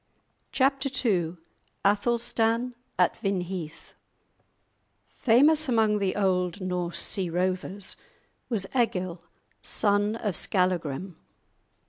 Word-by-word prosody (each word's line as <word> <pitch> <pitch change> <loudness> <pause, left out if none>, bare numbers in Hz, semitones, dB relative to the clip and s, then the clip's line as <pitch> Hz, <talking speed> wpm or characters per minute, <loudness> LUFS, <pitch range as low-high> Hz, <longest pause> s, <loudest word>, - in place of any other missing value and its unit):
*Chapter 275 +1 +2 0.2
II* 175 -4 +1 0.5
*Athelstan 235 +3 +1 0.2
at 180 -1 +3
Vinheath* 180 -5 -4 1.2
Famous 290 +5 +4
among 220 -3 +3
the 195 -2 0
old 185 -1 +1
Norse 180 -2 -2
sea 190 -4 0
rovers 185 +3 -1 0.5
was 215 -6 0
Egil, 185 -8 0 0.4
son 205 - +1
of 210 -5 -2
Skallagrim. 180 -2 -1
195 Hz, 85 wpm, -27 LUFS, 180-230 Hz, 1.2 s, Famous